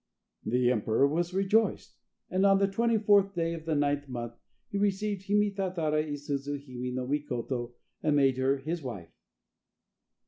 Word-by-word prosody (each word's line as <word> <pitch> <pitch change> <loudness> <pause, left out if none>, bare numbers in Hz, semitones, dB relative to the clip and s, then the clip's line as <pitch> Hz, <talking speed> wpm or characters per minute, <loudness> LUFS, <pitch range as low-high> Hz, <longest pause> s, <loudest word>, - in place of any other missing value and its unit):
The 125 +2 +2
emperor 115 +3 +2
was 170 +4 -1
rejoiced. 195 +4 +1 0.4
And 185 +1 +1
on 195 -1 +6
the 195 0 +3
24th 205 -2 +3
day 165 -1 0
of 165 -1 -7
the 160 -1 0
9th 145 0 0
month 120 -2 -5 0.3
he 200 - -3
received 200 0 -1
Hime 205 0 +3
tatara 175 -6 0
i 150 -1 -5
suzu 145 0 -3
hime 125 -2 -6
no 130 0 -2
Mikoto 125 -3 -3 0.3
and 150 -2 +2
made 135 -3 +3
her 135 +1 +2
his 160 +5 -4
wife. 100 - -7
150 Hz, 160 wpm, -29 LUFS, 130-195 Hz, 0.4 s, on